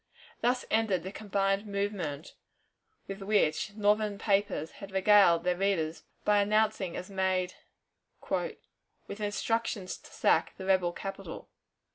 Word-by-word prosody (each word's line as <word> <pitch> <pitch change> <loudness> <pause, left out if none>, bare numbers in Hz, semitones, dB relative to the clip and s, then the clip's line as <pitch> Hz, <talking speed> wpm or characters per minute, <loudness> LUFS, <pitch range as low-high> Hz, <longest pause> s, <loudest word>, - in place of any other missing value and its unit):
Thus 245 +1 +1
ended 215 -6 +2
the 190 - -5
combined 200 0 -1
movement 200 -7 -3 0.7
with 195 +1 -6
which 200 -1 +1
Northern 210 0 +2
papers 195 -6 0
had 200 - -7
regaled 190 -3 +5
their 180 0 +1
readers 175 -4 -1 0.2
by 205 -1 +4
announcing 210 -3 +1
as 185 - -7
made 185 -1 0 0.7
"with 200 - -6
instructions 210 -1 -2
to - - -16
sack - - +2
the 190 - -7
rebel 185 -2 +3
capital." 195 -2 -7
195 Hz, 120 wpm, -30 LUFS, 185-210 Hz, 0.7 s, regaled